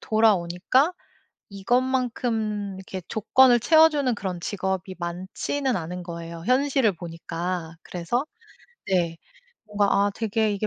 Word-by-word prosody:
돌아오니까 215 - +2 0.6
이것만큼 225 -2 -1
이렇게 190 0 -7
조건을 240 +3 +4
채워주는 300 -2 +4
그런 185 -3 -4
직업이 190 0 -3
많지는 190 +10 -2
않은 180 +1 -5
거예요 170 -1 -7
현실을 260 -3 +3
보니까. 165 0 -5
그래서 185 - -2 0.6
네. 175 -3 +1 0.5
뭔가 205 -1 +1 0.2
아 205 - 0
되게 220 -1 0
이게 205 +1 -2
205 Hz, 275 characters per minute, -25 LUFS, 180-245 Hz, 0.6 s, 조건을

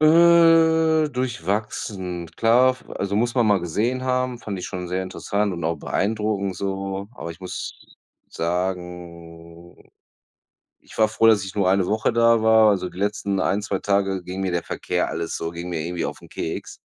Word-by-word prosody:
Äh, 160 -1 +5
durchwachsen. 100 - -3
Klar, 120 +3 +5
f 130 - -9
also 100 +1 -3
muss 120 +3 +1
man 120 -3 +3
mal 100 - +4
gesehen 115 +9 -1
haben, 125 -1 0
fand 100 -4 -5
ich 90 - -5
schon 90 0 -5
sehr 90 +2 -2
interessant 100 +2 -2
und 85 -2 -5
auch 85 +1 0
beeindruckend 105 -2 -1
so. 95 +1 -4
Aber 85 0 -6
ich 90 - -18
muss 90 -1 -6 0.5
sagen, 85 -1 -6 0.9
ich - - -16
war 110 -1 +4
froh, 115 +1 +2
dass 105 -3 +5
ich 95 +1 -8
nur 100 -3 +2
eine 95 -1 +2
Woche 110 +4 +1
da 115 -1 +4
war, 110 -1 +6
also 90 -2 0
die 90 - -13
letzten 100 -1 -1
1, 100 +2 +1
2 100 -2 -3
Tage 95 -2 0
ging 90 +2 -6
mir 95 -2 -1
der 85 - 0
Verkehr - - -2
alles 85 0 -3
so, 80 - -4
ging 85 +1 -7
mir 85 -2 -3
irgendwie 85 +2 -3
auf - - -7
'n - - -14
Keks. 80 - -5
100 Hz, 180 wpm, -23 LUFS, 90-115 Hz, 0.9 s, war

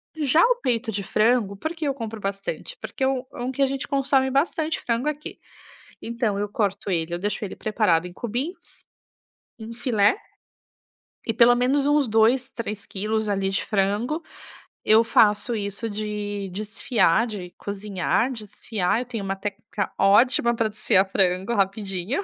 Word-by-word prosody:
Já 310 +1 +3
o - - +3
peito 235 -3 0
de 200 -1 -2
frango, 215 -1 +2
por 315 +11 -3
que 320 -2 -4
eu 275 - +1
compro 225 -4 -6
bastante? 195 - -4
Porque - - -5
é - - +4
um 265 -1 0
um 245 +2 -3
que 265 - -4
a - - +6
gente 270 0 -3
consome 270 -1 +2
bastante 315 +3 0
frango 240 +5 0
aqui. 300 0 -6 0.6
Então 230 -3 -1
eu 205 0 -2
corto 200 -1 -1
ele, 170 -2 -1
eu 175 - -2
deixo 205 +2 -2
ele 195 - -7
preparado 195 -6 +1
em 175 - -11
cubinhos, 245 - -5 0.8
em 225 +1 -7
filé, 230 - +2 1.1
e 225 - +1
pelo 235 +2 +6
menos 265 +3 +2
uns 290 -2 +3
2, 230 +4 +3
3 210 -3 -5
quilos 215 +2 -1
ali 195 -1 0
de 195 - -1
frango, 210 - 0 0.6
eu 220 +1 +6
faço 215 +1 +3
isso 205 +2 -3
de 205 -1 -4
desfiar, 215 0 +1
de 190 -5 -7
cozinhar, 205 +4 -1
desfiar, 215 -3 -2
eu - - -5
tenho 230 -4 -5
uma 195 0 -2
técnica 205 +1 -4
ótima 235 +4 +4
pra 225 -1 0
desfiar 200 -2 +3
frango 190 +2 +1
rapidinho. 195 - 0
220 Hz, 160 wpm, -24 LUFS, 200-250 Hz, 1.1 s, a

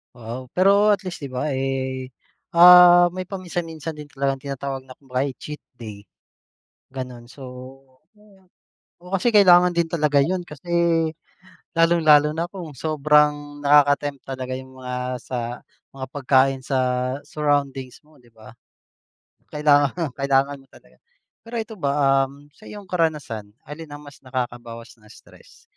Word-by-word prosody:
Wow, 120 +2 -8
pero 200 +3 +4
at 205 - +2
least 175 -5 -7
'di 135 - -6
ba, 135 +2 -2
eh, 130 -1 -3 0.4
ah, 175 0 +8
may 185 - -3
paminsan-minsan 170 -4 -6
din 150 -1 -11
talagang 135 -1 -2
tinatawag 135 -1 -5
na 130 - -17
kung 140 - -24
baga 125 +1 -1
ay 140 - -2
cheat 150 0 -8 0.2
day, 105 -3 -9 0.9
gano'n. 125 -3 -8
So, 135 +2 -14 0.7
o, 195 -3 -23 0.6
oo, 180 - -13
kasi 210 +4 +1
kailangan 180 -3 +6
din 170 -1 0
talaga 150 -4 +2
'yon 180 +2 -3
kasi 150 +4 -10 1.0
lalong-lalo 160 -3 +4
na 165 - -1
kung 175 -5 -9
sobrang 150 0 +1
nakaka-tempt 145 -1 +3
talaga 130 -1 -6
yung 130 0 -8
mga 125 -1 -6 0.3
sa 125 - -4 0.6
mga 130 -1 -5
pagkain 135 -1 +2
sa 135 0 -2 0.5
surroundings 140 -3 -2
mo, 155 -2 -23
'di 120 - -23
ba? 110 -1 -16 1.0
Kailangang 150 +1 +1
kailangan 140 +1 +1
mo 135 - -22
talaga. - - -22 0.5
Pero 235 - -8
ito 220 -3 -12
ba, 140 -1 +2
um, 145 +2 -17
sa 215 - -17
iyong 205 -1 -9
karanasan, 145 - -2
alin 150 +3 -9
ang 145 0 -11
mas 145 -1 -14
nakakabawas 120 -3 -7
ng 110 - -21
stress? - - -19
145 Hz, 145 wpm, -22 LUFS, 130-165 Hz, 1.0 s, ah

